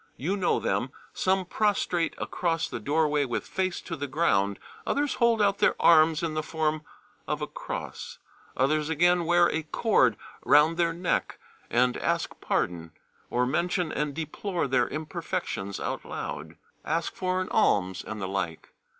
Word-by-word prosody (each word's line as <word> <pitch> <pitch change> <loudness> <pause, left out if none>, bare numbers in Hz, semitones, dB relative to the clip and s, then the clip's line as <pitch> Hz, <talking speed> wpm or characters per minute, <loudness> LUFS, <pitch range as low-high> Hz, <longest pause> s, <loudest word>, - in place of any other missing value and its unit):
You 175 +9 -1
know 190 -3 +1
them: - - -1 0.2
Some 190 0 +1
prostrate 180 -4 0
across 165 -2 -1
the - - -5
doorway 150 0 +1
with 120 -3 -3
face 185 -1 -2
to 165 - -5
the 145 -2 -4
ground, 100 -10 +1 0.3
others 290 0 0
hold 230 -2 +4
out 200 0 +2
their - - +4
arms 160 0 +5
in 165 -2 -1
the 155 - -1
form 155 -1 -1 0.5
of - - -1
a - - -2
cross, - - -6 0.4
others 150 +3 +2
again 175 +2 +3
wear 175 +1 +5
a 160 - -1
cord 150 - +2 0.3
round 155 +3 +5
their 170 -1 +2
neck, 175 +1 -1 0.3
and 125 +1 +2
ask - - -1
pardon, 85 -2 -1 0.4
or 125 +1 +1
mention 170 +4 0
and 145 -1 -2
deplore 165 +2 -2
their 130 -2 +2
imperfections 150 - -4
out - - -3
loud, - - -6 0.3
ask 165 +2 -1
for 185 0 -1
an 185 - -3
alms 95 -2 +2
and 110 0 -6
the 95 - -3
like. 95 -4 -4
160 Hz, 160 wpm, -27 LUFS, 130-175 Hz, 0.5 s, arms